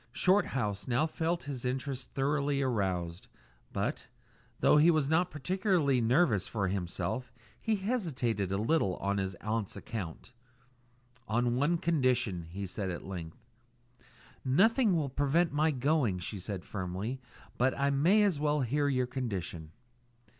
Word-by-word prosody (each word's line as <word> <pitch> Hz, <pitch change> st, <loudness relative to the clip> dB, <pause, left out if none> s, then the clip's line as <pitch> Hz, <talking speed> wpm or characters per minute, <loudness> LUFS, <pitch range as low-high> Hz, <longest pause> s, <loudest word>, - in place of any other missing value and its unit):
Shorthouse 130 Hz, -, +1 dB
now 125 Hz, +5 st, +2 dB
felt 165 Hz, +1 st, -1 dB
his 135 Hz, -4 st, -5 dB
interest 130 Hz, +1 st, -3 dB
thoroughly 140 Hz, +1 st, +1 dB
aroused; 95 Hz, -9 st, -1 dB, 0.4 s
but, -, -, -2 dB, 0.5 s
though -, -, +5 dB
he 155 Hz, +3 st, +6 dB
was 155 Hz, -4 st, +3 dB
not 165 Hz, +4 st, +2 dB
particularly 170 Hz, -, +1 dB
nervous 115 Hz, -, +3 dB
for 100 Hz, -4 st, -1 dB
himself, 100 Hz, +6 st, -3 dB, 0.3 s
he 220 Hz, -1 st, +1 dB
hesitated 145 Hz, -, -1 dB
a 95 Hz, -, +1 dB
little 110 Hz, -, +1 dB
on 100 Hz, 0 st, -1 dB
his 95 Hz, -1 st, -2 dB
aunt's 110 Hz, -1 st, -2 dB
account. 110 Hz, +1 st, -6 dB, 0.9 s
"On 120 Hz, +2 st, +1 dB
one 145 Hz, +7 st, +2 dB
condition," 125 Hz, -, +1 dB
he 100 Hz, +3 st, -5 dB
said 95 Hz, +1 st, -4 dB
at 85 Hz, -, -5 dB
length. 85 Hz, -2 st, -7 dB, 1.0 s
"Nothing 205 Hz, -, +4 dB
will 155 Hz, -4 st, +1 dB
prevent 145 Hz, +5 st, +1 dB
my 155 Hz, +2 st, +3 dB
going," 135 Hz, -7 st, +1 dB
she 95 Hz, +3 st, -5 dB
said 95 Hz, -1 st, -5 dB
firmly; 100 Hz, +7 st, -4 dB, 0.4 s
"but 130 Hz, +2 st, +2 dB
I 140 Hz, 0 st, +2 dB
may 175 Hz, +10 st, +4 dB
as 190 Hz, -8 st, +2 dB
well 150 Hz, 0 st, +1 dB
hear 145 Hz, +4 st, +1 dB
your 130 Hz, -2 st, +1 dB
condition." 95 Hz, -, -4 dB
130 Hz, 140 wpm, -31 LUFS, 100-155 Hz, 1.0 s, he